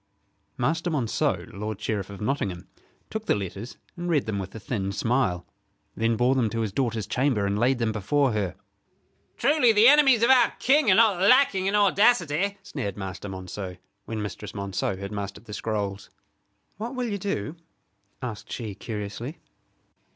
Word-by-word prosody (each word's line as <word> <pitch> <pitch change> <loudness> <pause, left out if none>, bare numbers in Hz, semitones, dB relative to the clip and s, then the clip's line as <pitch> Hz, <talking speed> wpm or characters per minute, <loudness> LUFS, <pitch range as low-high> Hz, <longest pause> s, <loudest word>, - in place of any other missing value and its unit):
Master 165 +2 0
Monceux, 135 -9 0
lord 105 +1 -5
Sheriff 105 -2 -2
of 100 -1 -9
Nottingham, 105 -7 -2 0.4
took 220 0 -4
the - - +3
letters 100 +4 -6 0.2
and 175 0 -4
read 150 -5 +2
them 105 -2 -2
with 95 +1 -6
a - - -6
thin 100 -3 -3
smile; 115 -6 0 0.5
then 115 0 +1
bore 125 +3 +3
them 125 -5 +1
to 115 +1 -2
his 110 -3 -1
daughter's 115 -3 -1
chamber, 125 -5 +1
and 100 +1 0
laid 125 +3 +3
them 115 -2 0
before 125 +7 +1
her. 105 -4 -2 0.8
"Truly 285 -5 +4
the 215 +2 +6
enemies 270 -5 +6
of 235 - +6
our 255 -2 +5
King 280 -1 +3
are 185 - +6
not 210 -4 +4
lacking 200 -3 +4
in 200 - +1
audacity," 200 -3 +3
sneered 100 - -5
Master 95 0 -6
Monceux, 95 0 -6 0.3
when 110 -2 -4
Mistress 105 -1 -6
Monceux 100 -1 -2
had 100 +1 -6
mastered 100 +1 -6
the 105 - -9
scrolls. 105 -2 -3 0.7
"What 230 +5 -5
will 250 -1 -1
you 205 -2 -3
do?" 170 - -3 0.7
asked 115 -4 -6
she, 110 -4 -4
curiously. 110 - -6
115 Hz, 165 wpm, -26 LUFS, -, 0.8 s, the